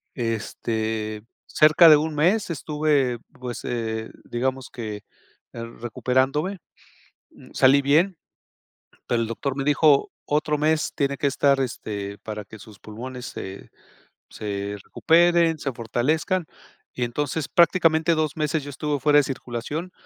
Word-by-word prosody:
Este, 110 Hz, -2 st, -3 dB, 0.2 s
cerca 155 Hz, +2 st, +6 dB
de 155 Hz, -, +9 dB
1 155 Hz, +1 st, -2 dB
mes 180 Hz, +7 st, +2 dB
estuve, 150 Hz, -4 st, 0 dB, 0.2 s
pues, 125 Hz, -1 st, -6 dB
eh, 110 Hz, -2 st, -3 dB
digamos 130 Hz, +2 st, -2 dB
que, 110 Hz, -3 st, -5 dB, 0.6 s
eh, 115 Hz, -, -6 dB, 0.2 s
recuperándome, 135 Hz, -, 0 dB, 0.7 s
mm, -, -, -17 dB
salí 135 Hz, +2 st, +5 dB
bien, 165 Hz, +7 st, +3 dB, 0.9 s
pero 120 Hz, -1 st, +1 dB
el 115 Hz, -, -1 dB
doctor 130 Hz, +4 st, -3 dB
me 135 Hz, -, -2 dB
dijo: 150 Hz, -1 st, +4 dB
"Otro 150 Hz, 0 st, 0 dB
mes 155 Hz, +1 st, +1 dB
tiene 140 Hz, -1 st, 0 dB
que 145 Hz, -, 0 dB
estar, 140 Hz, 0 st, +2 dB
este, 100 Hz, -5 st, -4 dB
para 105 Hz, -1 st, -6 dB
que 110 Hz, -, -12 dB
sus 105 Hz, -1 st, -14 dB
pulmones 125 Hz, +4 st, -8 dB
se 95 Hz, +1 st, -8 dB, 0.6 s
se 100 Hz, -1 st, -4 dB
recuperen, 170 Hz, 0 st, +3 dB
se 140 Hz, -2 st, -3 dB
fortalezcan". 150 Hz, -, -1 dB, 0.5 s
Y 125 Hz, -, -1 dB
entonces, 145 Hz, +5 st, -2 dB
prácticamente 165 Hz, -2 st, +3 dB
2 155 Hz, 0 st, -1 dB
meses 155 Hz, -1 st, -1 dB
yo 145 Hz, -, -7 dB
estuve 145 Hz, +1 st, -2 dB
fuera 145 Hz, +2 st, +5 dB
de -, -, +6 dB
circulación, 135 Hz, +6 st, -5 dB
140 Hz, 135 wpm, -24 LUFS, 115-155 Hz, 0.9 s, de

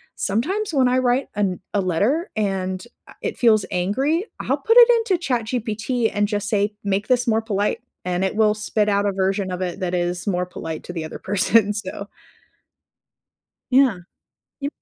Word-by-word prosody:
sometimes 350 Hz, -, -1 dB
when 265 Hz, -3 st, +4 dB
I 250 Hz, +1 st, +2 dB
write 255 Hz, +1 st, +1 dB
an 195 Hz, -3 st, 0 dB
a 205 Hz, -, +2 dB
letter 210 Hz, -, 0 dB
and, 190 Hz, -3 st, -2 dB, 0.2 s
uh, -, -, -14 dB
it -, -, -3 dB
feels 220 Hz, -4 st, +4 dB
angry, 265 Hz, -, 0 dB
I'll -, -, 0 dB
put 455 Hz, +1 st, +2 dB
it 485 Hz, 0 st, +9 dB, 0.2 s
into 370 Hz, -, +3 dB
ChatGPT 235 Hz, -2 st, -1 dB
and 205 Hz, 0 st, +1 dB
just 205 Hz, 0 st, -2 dB
say, 205 Hz, 0 st, +1 dB
"Make 200 Hz, 0 st, -1 dB
this 245 Hz, -1 st, +3 dB
more 225 Hz, -1 st, +2 dB
polite." 205 Hz, -2 st, -1 dB, 0.3 s
And 180 Hz, 0 st, -1 dB
it 190 Hz, -, -2 dB
will 215 Hz, -1 st, +4 dB
spit 210 Hz, 0 st, 0 dB
out 200 Hz, 0 st, +2 dB
a -, -, +1 dB
version 190 Hz, 0 st, 0 dB
of 180 Hz, 0 st, -4 dB
it 180 Hz, 0 st, -3 dB
that 180 Hz, -2 st, -2 dB
is 175 Hz, +2 st, -2 dB
more 180 Hz, -2 st, 0 dB
polite 165 Hz, -3 st, -6 dB
to 175 Hz, -, -7 dB
the 165 Hz, -2 st, -4 dB
other 155 Hz, -, -7 dB
person, 205 Hz, +2 st, +2 dB
so 200 Hz, 0 st, -5 dB, 1.6 s
Yeah. 255 Hz, -7 st, +4 dB, 0.6 s
Y 280 Hz, -, -2 dB
210 Hz, 180 wpm, -22 LUFS, 190-245 Hz, 1.6 s, it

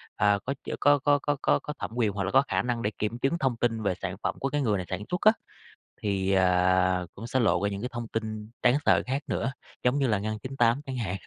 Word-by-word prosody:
à, 100 Hz, -1 st, +3 dB
có 140 Hz, -, -1 dB
ch 140 Hz, -, -11 dB
có 145 Hz, 0 st, +5 dB
có 145 Hz, +1 st, +3 dB
có 145 Hz, +1 st, 0 dB
có -, -, +3 dB
có 150 Hz, -, -6 dB
thẩm -, -, -4 dB
quyền 115 Hz, -4 st, +1 dB
hoặc 100 Hz, 0 st, -3 dB
là 95 Hz, -, -2 dB
có 135 Hz, -, +6 dB
khả -, -, +1 dB
năng 120 Hz, -1 st, -2 dB
để 105 Hz, -, -1 dB
kiểm 105 Hz, +3 st, -2 dB
chứng 135 Hz, +7 st, +1 dB
thông 130 Hz, -6 st, 0 dB
tin 115 Hz, -2 st, 0 dB
về 95 Hz, -3 st, +1 dB
sản 90 Hz, 0 st, -5 dB
phẩm -, -, -1 dB
của 135 Hz, -, -1 dB
cái 145 Hz, +1 st, -1 dB
người 110 Hz, -6 st, +1 dB
này 90 Hz, -, -4 dB
sản 95 Hz, +2 st, -3 dB
xuất 180 Hz, -, -2 dB
á, 215 Hz, -, +7 dB, 0.7 s
thì, 100 Hz, -2 st, 0 dB
à, 90 Hz, -1 st, +3 dB
cũng 115 Hz, +3 st, -7 dB
sẽ 130 Hz, +1 st, 0 dB
lộ 110 Hz, -4 st, +2 dB
ra 100 Hz, -, +2 dB
những 100 Hz, 0 st, -5 dB
cái 125 Hz, -, -3 dB
thông 120 Hz, -1 st, -5 dB
tin 110 Hz, -1 st, -4 dB
đáng 120 Hz, +1 st, +5 dB
sợ -, -, +4 dB
khác 135 Hz, +3 st, -1 dB
nữa 130 Hz, -1 st, -1 dB, 0.3 s
giống 125 Hz, +3 st, +2 dB
như 135 Hz, -, +2 dB
là 105 Hz, -4 st, +1 dB
Ngân 110 Hz, +1 st, -3 dB
98 125 Hz, +1 st, +1 dB
chẳng 130 Hz, -2 st, -4 dB
hạn. 100 Hz, -6 st, -2 dB
115 Hz, 270 wpm, -27 LUFS, 100-130 Hz, 0.7 s, á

